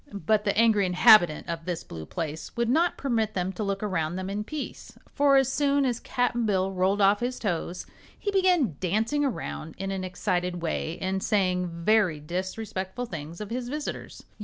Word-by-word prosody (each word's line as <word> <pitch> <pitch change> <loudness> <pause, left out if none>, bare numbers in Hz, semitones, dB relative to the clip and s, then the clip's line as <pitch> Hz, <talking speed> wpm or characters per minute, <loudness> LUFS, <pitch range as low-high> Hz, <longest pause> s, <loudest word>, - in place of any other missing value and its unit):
But 215 +3 +2
the 200 0 +1
angry 215 -4 +4
inhabitant 180 -3 +6
of 165 -1 -4
this 175 -2 -3
blue 80 -2 -9
place 160 +3 -5
would 235 -1 +1
not 330 +7 +2
permit 225 -5 -1
them 185 0 -1
to 185 - -6
look 200 0 -2
around 175 -5 -1
them 190 +1 -4
in 205 +1 -2
peace, 300 +6 -7 0.2
for 280 -1 +4
as 270 -1 +3
soon 285 -1 +2
as 245 -2 0
Cap'n 245 -1 0
Bill 190 -2 +1
rolled 190 +2 +1
off 200 +1 +5
his 250 +1 -2
toes 180 -3 -3 0.3
he 405 - -2
began 360 - +2
dancing 220 +10 0
around 195 - -4
in 195 +1 -3
an 190 -1 -3
excited 180 -1 -2
way 160 0 -2
and 190 0 -1
saying 185 -3 +1 0.2
very 205 -8 +3
disrespectful 190 +6 -4
things 165 -4 -7
of 210 0 -6
his 245 0 -3
visitors. 295 +2 -5
200 Hz, 185 wpm, -27 LUFS, 180-240 Hz, 0.3 s, inhabitant